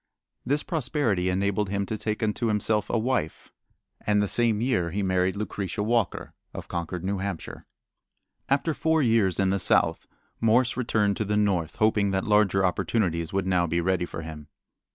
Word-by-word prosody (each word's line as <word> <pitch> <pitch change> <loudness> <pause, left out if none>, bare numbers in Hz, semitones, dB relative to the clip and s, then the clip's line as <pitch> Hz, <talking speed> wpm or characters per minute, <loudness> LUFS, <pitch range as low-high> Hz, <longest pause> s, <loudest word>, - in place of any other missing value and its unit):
This 145 +4 0
prosperity 125 - 0
enabled 100 +2 0
him 100 0 -1
to 110 - -3
take 110 +1 -3
unto 110 +2 0
himself 105 -1 0
a - - +1
wife, 110 -9 -2 0.5
and 105 -1 +2
the 105 - +1
same 115 0 +1
year 115 -8 0
he 100 +4 -2
married 95 0 +1
Lucretia 105 -1 -3
Walker, 115 -2 -1 0.2
of - - -7
Concord, 85 +1 -4
New 95 +1 -1
Hampshire. 95 -3 -6 0.8
After 145 +4 +1
four 160 0 +1
years 110 -7 +2
in 95 -1 +2
the 100 - 0
South - - +2 0.3
Morse 115 +2 +3
returned 105 -5 +1
to - - 0
the 105 +1 0
North, 90 -6 0
hoping 105 -2 +2
that 95 0 0
larger 105 -3 +3
opportunities 90 -3 0
would 95 -1 -1
now 90 -2 +2
be 85 +2 0
ready 90 0 0
for 80 - -7
him. 75 -2 -9
100 Hz, 175 wpm, -26 LUFS, 95-110 Hz, 0.8 s, Morse